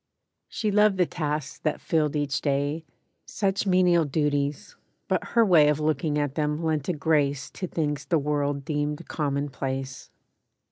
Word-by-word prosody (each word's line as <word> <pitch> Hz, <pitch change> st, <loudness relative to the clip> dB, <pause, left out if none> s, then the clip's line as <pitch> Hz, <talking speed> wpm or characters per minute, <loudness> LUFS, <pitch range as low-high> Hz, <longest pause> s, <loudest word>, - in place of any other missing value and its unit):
She 215 Hz, -2 st, -2 dB
loved 210 Hz, -1 st, +4 dB
the 180 Hz, -, +4 dB
tasks 150 Hz, -4 st, -3 dB
that 155 Hz, -, -1 dB
filled 155 Hz, -2 st, 0 dB
each 145 Hz, -2 st, -1 dB
day— 145 Hz, +2 st, -1 dB, 0.4 s
Such 200 Hz, 0 st, -1 dB
menial 180 Hz, -2 st, +4 dB
duties; 145 Hz, -1 st, -1 dB, 0.3 s
but -, -, 0 dB
her 230 Hz, -1 st, +6 dB
way 165 Hz, -7 st, +6 dB
Of 150 Hz, 0 st, +2 dB
looking 155 Hz, 0 st, 0 dB
at 145 Hz, -2 st, -1 dB
them 150 Hz, +1 st, -1 dB
lent 155 Hz, -2 st, -1 dB
a -, -, +2 dB
grace 145 Hz, -3 st, 0 dB
To 185 Hz, -, -5 dB
things 150 Hz, -4 st, -2 dB
the 165 Hz, -, +2 dB
world 145 Hz, -1 st, -1 dB
deemed 150 Hz, +1 st, -2 dB
commonplace. 135 Hz, -3 st, -3 dB
150 Hz, 150 wpm, -26 LUFS, 145-165 Hz, 0.4 s, her